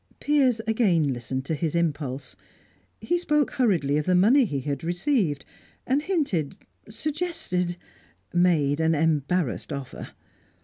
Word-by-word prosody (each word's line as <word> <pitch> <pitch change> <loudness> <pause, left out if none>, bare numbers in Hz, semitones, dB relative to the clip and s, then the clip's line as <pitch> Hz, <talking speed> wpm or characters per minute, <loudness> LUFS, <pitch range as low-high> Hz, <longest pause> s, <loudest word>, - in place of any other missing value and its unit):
Piers 265 -6 +2
again 185 - +2
listened 130 +2 -4
to 160 - -2
his 160 +1 -2
impulse. 145 -5 -2 0.7
He 350 0 0
spoke 300 -4 +1
hurriedly 170 - +1
of 150 - -2
the 180 - +3
money 235 +9 +5
he 140 -9 -3
had 140 +1 -4
received, 175 - 0 0.4
and 270 +3 +1
hinted, 290 - -1 0.3
suggested, 225 - -2 0.6
made 165 -5 +2
an 160 0 +2
embarrassed 155 -1 0
offer. 140 -3 -6
175 Hz, 125 wpm, -25 LUFS, 145-245 Hz, 0.7 s, money